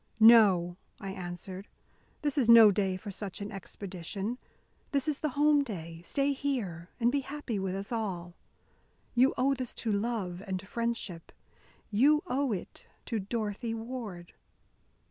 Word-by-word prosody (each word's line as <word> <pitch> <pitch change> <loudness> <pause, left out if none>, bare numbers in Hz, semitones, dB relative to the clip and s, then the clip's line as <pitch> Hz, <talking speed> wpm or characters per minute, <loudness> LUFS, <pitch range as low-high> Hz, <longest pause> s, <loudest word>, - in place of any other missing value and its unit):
"No," 200 -6 +7 0.2
I 195 -2 -5
answered, 185 +1 -6 0.6
"this 290 -2 0
is 255 -6 +2
no 225 -3 +10
day 190 -2 0
for 200 +2 -7
such 195 0 -5
an 205 +1 -5
expedition. 195 +3 -5 0.5
This 275 -1 +1
is 300 -2 0
the 305 - 0
home 295 0 +5
day. 165 -9 -7
Stay 280 +9 +1
here 210 -12 -3
and 240 0 +3
be 285 - +1
happy 275 -5 -4
with 190 -1 -2
us 195 +3 -5
all. 185 -7 -3 0.8
You 255 +2 +4
owe 270 +2 +3
this 255 -3 -4
to 225 - -2
love 200 -4 -1
and 190 0 -4
friendship. 230 -7 -3 0.6
You 285 +8 +4
owe 265 0 0
it 190 -4 -6 0.2
to 225 - -1
Dorothy 220 +2 -3
Ward." 225 -7 -6
215 Hz, 145 wpm, -30 LUFS, 190-250 Hz, 0.8 s, no